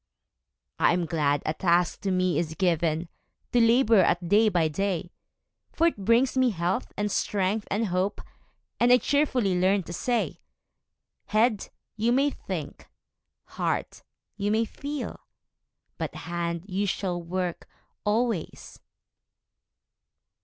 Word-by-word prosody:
I - - +4
am 175 -1 0
glad 150 -3 0
a 155 - 0
task 175 +1 +1
to 200 - -2
me 185 -1 +1
is 160 -2 -3
given 170 -2 0 0.4
To 240 - +4
labor 230 -1 +5
at 175 -1 +2
day 215 +2 +5
by 175 -5 +2
day; 175 +1 -2 0.6
For 330 - +1
it 265 -12 0
brings 240 +5 +3
me 260 -1 +4
health, 185 +3 -2
and 210 0 -1
strength, 205 +2 0
and 215 +3 0
hope, 185 +1 -1 0.6
And 240 +1 +4
I 250 - +8
cheerfully 250 -10 +1
learn 190 +1 +2
to 170 - -8
say 235 +7 -1 0.9
'Head, 215 -1 +1 0.3
you 225 +2 +1
may 275 +3 +3
think; - - -7 0.5
heart, - - -3 0.4
you 205 0 -1
may 220 +2 +2
feel; 285 +5 -6 0.8
But - - -4
hand, 170 0 -4
you 200 +1 -1
shall 180 -2 -2
work 180 0 -4 0.3
always!' 215 -4 -2
195 Hz, 130 wpm, -26 LUFS, 175-230 Hz, 0.9 s, I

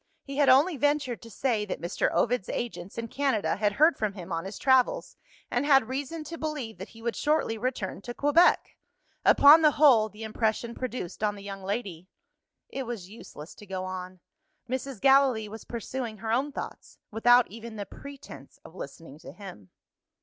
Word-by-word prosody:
He 275 0 -7
had 285 -2 +4
only 290 +6 +5
ventured 290 -3 0
to 230 - -12
say 225 0 -1
that 210 - -5
Mr. 170 +2 -1
Ovid's 245 -4 0
agents 225 -5 -5
in 230 0 -3
Canada 265 -3 0
had 205 0 +1
heard 310 +8 +4
from 215 -2 -1
him 185 -2 -9
on 165 +1 -2
his 195 +1 -7
travels, 260 -2 +2 0.4
and 245 - +1
had 270 -5 +4
reason 280 +5 -4
to 330 +2 -8
believe 295 -8 -4
that - - -8
he 225 0 -15
would 235 -1 -2
shortly 300 -7 +1
return 220 -5 -3
to 240 +3 -7
Quebec. 290 +5 +3 0.5
Upon 295 +3 +8
the 305 - +6
whole, 245 -8 +5
the 215 +1 -11
impression 220 +1 -1
produced 250 -7 -5
on 205 -1 +1
the 200 - -11
young 195 -1 -7
lady 190 -3 -4 0.6
It 270 -3 -5
was 205 -6 -6
useless 170 -8 -11
to 210 - -14
go 185 0 -4
on. 185 -1 -7 0.5
Mrs. 260 -1 -4
Gallilee 270 -4 +4
was 220 +2 -10
pursuing 235 -1 -5
her 220 +1 -4
own 265 +5 +1
thoughts, - - -8
without 240 +3 +5
even 230 +1 -9
the 205 -1 -5
pretence 275 - -12
of - - -13
listening 150 -3 -10
to 165 - -11
him. 175 - -11
230 Hz, 185 wpm, -27 LUFS, 200-270 Hz, 0.6 s, Upon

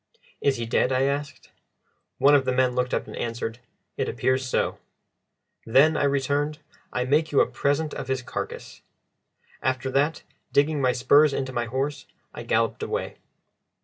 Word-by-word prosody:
"Is 140 -3 +2
he 115 - -3
dead?" 120 +3 +1
I 130 0 +2
asked. 140 +1 -3 0.7
One 145 - +5
of 140 -2 +5
the 130 - +1
men 125 0 +2
looked 125 0 -1
up - - -1
and - - -9
answered, 115 0 -4 0.4
"It - - -1
appears 130 0 0
so." - - -1 0.8
"Then," 140 +7 +4
I 145 - +1
returned, 140 +2 0 0.3
"I 125 - -1
make 150 +4 +2
you 140 - +3
a - - +6
present 145 +2 -1
of 130 - -6
his 130 -1 -2
carcass." - - -6 0.8
After 130 0 -1
that, 145 +4 +1 0.3
digging 145 0 +2
my 130 -1 +3
spurs 145 +4 +4
into 130 -1 -3
my 120 -1 -1
horse, 135 +5 -3 0.3
I - - -7
galloped - - 0
away. - - -3
135 Hz, 165 wpm, -25 LUFS, 125-145 Hz, 0.8 s, a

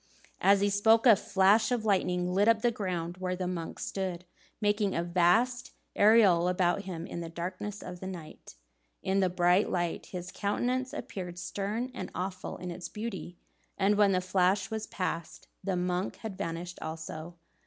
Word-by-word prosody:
As 200 0 +5
he 205 - +3
spoke, 220 +4 +4
a 230 -4 +9
flash 200 +4 +3
of 235 -3 0
lightning 180 -3 +1
lit 200 +3 +3
up 230 -1 +4
the 240 - +4
ground 180 -5 -3
where 185 0 -2
the 180 0 -3
monk 175 -2 -4
stood, 185 -2 -4 0.3
making 205 -1 +1
a 170 - 0
vast 225 +10 +2 0.2
aureole 205 -5 +6
about 180 +2 +1
him 170 -3 -5
in 170 - -6
the 165 - -5
darkness 185 +5 -5
of 180 0 -7
the 190 - -6
night. 165 - -9 0.5
In 190 +1 +1
the 190 -2 +3
bright 180 +2 +3
light, 175 -2 -2
his 180 -1 -6
countenance 250 +7 -1
appeared 180 -11 -6
stern 205 +7 -3
and - - -5
awful 185 +1 -4
in 180 -1 -6
its 175 +1 -6
beauty, 210 -5 -6 0.4
and 200 +1 +3
when 205 -1 +5
the 185 -1 +2
flash 185 +2 +1
was 220 0 -3
passed, 170 -3 -4 0.2
the 195 -2 -1
monk 180 +1 -1
had 220 -4 -7
vanished 170 0 -5
also. 160 +1 -6
185 Hz, 175 wpm, -30 LUFS, 175-205 Hz, 0.5 s, a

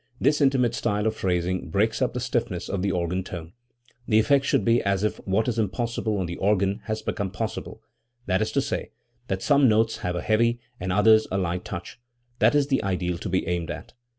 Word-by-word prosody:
This" 150 +1 +2
intimate 130 -4 +3
style 105 -2 -1
of 110 0 +1
phrasing 90 -2 -1
breaks 110 +4 +1
up 125 - 0
the - - -1
stiffness 120 -7 -2
of 95 -2 -2
the 100 0 0
organ 90 +1 -1
tone. 85 -3 -8 0.5
The 110 - +3
effect 135 +5 +3
should - - +1
be 115 0 +4
as 100 0 0
if 105 - 0
what 100 +5 +1
is 115 -2 0
impossible 110 +1 -1
on 95 - -1
the 85 0 -5
organ 100 +1 +1
had 110 -1 -2
become 100 -3 -2
possible, 95 - -5 0.4
that 95 +1 +1
is 110 0 0
to 140 - +2
say, - - -3 0.4
that 95 0 -2
some 140 -3 +5
notes 110 +1 +2
have 90 0 -3
a 90 - -2
heavy 115 +2 +2 0.2
and 90 +1 -3
others 110 +3 +5
a 95 - 0
light 90 -1 -1
touch. 90 +5 -7 0.4
That - - +4
is 145 -1 +4
the 135 -1 0
ideal 90 -3 -1
to 100 - -5
be 95 +1 0
aimed 85 -1 -2
at. - - -7
105 Hz, 215 wpm, -25 LUFS, 95-115 Hz, 0.5 s, some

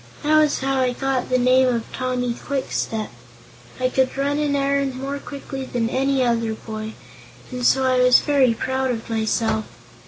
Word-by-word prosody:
That 310 +1 +4
was 300 -1 +2
how 270 0 0
I 255 -1 +1
got 270 0 -2
my 255 - +3
name 255 +1 +4
of 235 -2 0
Tommy 250 -1 -1
Kwikstep. 235 -5 -3 0.7
I 255 - +2
could 260 +1 0
run 285 +1 0
an 295 -1 0
errand 275 -1 0
more 275 +2 -4
quickly 275 -1 -7
than 240 -2 -2
any 270 0 +1
other 230 -2 0
boy, 220 0 -7 0.6
and 250 -1 -5
so 265 +2 +4
I 255 -1 +2
was 250 0 +7
very 270 -5 +2
proud 260 +2 -1
of 230 -2 -4
myself. 220 0 0
255 Hz, 175 wpm, -22 LUFS, 240-270 Hz, 0.7 s, was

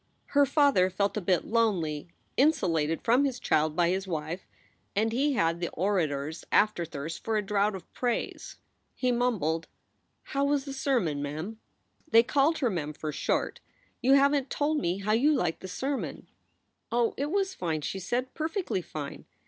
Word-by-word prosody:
Her 285 -1 +5
father 275 -11 +4
felt 200 +2 0
a 210 - -1
bit 180 -1 +1
lonely, 180 -11 0 0.3
insulated 165 - +2
from 245 +4 +4
his 265 -3 -1
child 155 0 +1
by 170 -1 +3
his 190 +2 -1
wife; 165 +1 -4 0.5
and 220 +2 +2
he 280 +5 +1
had 165 -7 +1
the 175 - -2
orator 160 -7 0
s 160 +2 -7
afterthirst 165 -6 +1
for 225 -1 0
a 210 - 0
draught 205 0 +1
of 190 - -11
praise. 245 -2 -2 0.4
He 255 -1 +1
mumbled: 215 -10 0 0.6
"How 275 0 -1
was 280 -1 +1
the 275 - -5
sermon, 240 - 0
Mem?" 155 +10 -5 0.5
They 230 -4 +7
called 285 +5 +2
her 255 -5 +1
Mem 155 -5 -3
for 155 +1 -4
short. - - -1 0.4
You 265 +2 +5
haven 280 0 +4
t - - -31
told 300 +1 0
me 175 -3 0
how 200 +2 -2
you 280 +8 +4
liked 170 - 0
the 190 - -7
sermon. 270 +9 -3 0.7
"Oh, 235 0 +2
it 285 +2 -2
was 385 +2 0
fine," 160 - -2
she 190 +6 -3
said, 250 +7 -2
"perfectly 320 - -2
fine. 150 -4 -7
210 Hz, 175 wpm, -28 LUFS, 165-270 Hz, 0.7 s, They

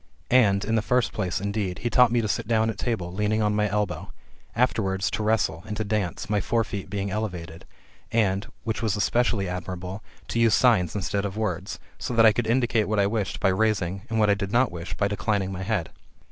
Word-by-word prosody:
And, 105 -5 +4
in 110 - -1
the 110 - +3
first 125 +2 +1
place, 95 -4 -2
indeed, 100 -2 -2
he 120 - +1
taught 125 0 +5
me 120 -1 +2
to 110 - -1
sit 100 - -2
down 110 -1 +2
at - - -11
table, 95 -8 -2
leaning 105 +2 0
on 105 0 +2
my 105 0 +1
elbow; 105 0 -2 0.4
afterwards, 100 -5 +1
to - - -2
wrestle, 110 +1 +1
and 105 0 -4
to 110 - -1
dance, 105 -4 -2
my 105 -1 +1
fore 115 +4 +1
feet 100 -2 -6
being 100 0 -3
elevated; 90 -6 -5 0.5
and, 100 -3 +1 0.2
which 110 -1 -2
was 110 -3 0
especially 110 -1 +1
admirable, 90 +2 -5 0.3
to 115 - -1
use 115 -2 +5
signs 105 -9 +3
instead 100 0 -1
of 100 0 -4
words; 95 -3 -2 0.2
so 125 - -3
that 115 0 +6
I 110 - +7
could 115 +1 -1
indicate 120 -2 +2
what 110 0 0
I 100 - +4
wished 105 -1 -2
by 95 - +3
raising, 95 -2 0
and 115 - -1
what 105 -2 +4
I - - +6
did 100 -1 -3
not 125 -1 +3
wish 85 +1 -6
by 100 - +2
declining 100 -1 -1
my 95 -1 -5
head. 95 -3 -2
105 Hz, 220 wpm, -25 LUFS, 95-110 Hz, 0.5 s, I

